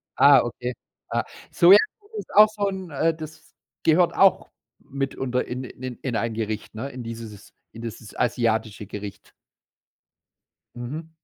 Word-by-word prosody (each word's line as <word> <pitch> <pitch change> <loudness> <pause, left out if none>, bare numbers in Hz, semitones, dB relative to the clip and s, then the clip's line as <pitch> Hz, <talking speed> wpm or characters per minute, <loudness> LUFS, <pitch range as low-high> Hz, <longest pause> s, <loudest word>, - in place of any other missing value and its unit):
Ah, 140 -2 +7
okay. 120 +1 -4 0.4
Ah, - - 0 0.3
Sojasoße 340 - +4
ist - - -7
auch 215 +1 +9
so 205 -2 -2
'n, 190 -2 -5
äh, 160 +4 +1
das 155 -1 -11 0.3
gehört 170 +2 +4
auch 195 -2 +4 0.3
mitunter 135 -2 -2
in 125 +1 -5
in 130 -1 -7
in 125 -3 -3
ein 115 -1 -1
Gericht, 110 -1 -4
ne? 130 +5 -4
In 125 -2 -8
dieses 115 -3 -9 0.2
in 115 - -10
dieses 110 -1 -8
asiatische 110 -3 0
Gericht. 100 0 -8 1.4
Mhm. 145 +7 -6
125 Hz, 140 wpm, -24 LUFS, 115-165 Hz, 1.4 s, auch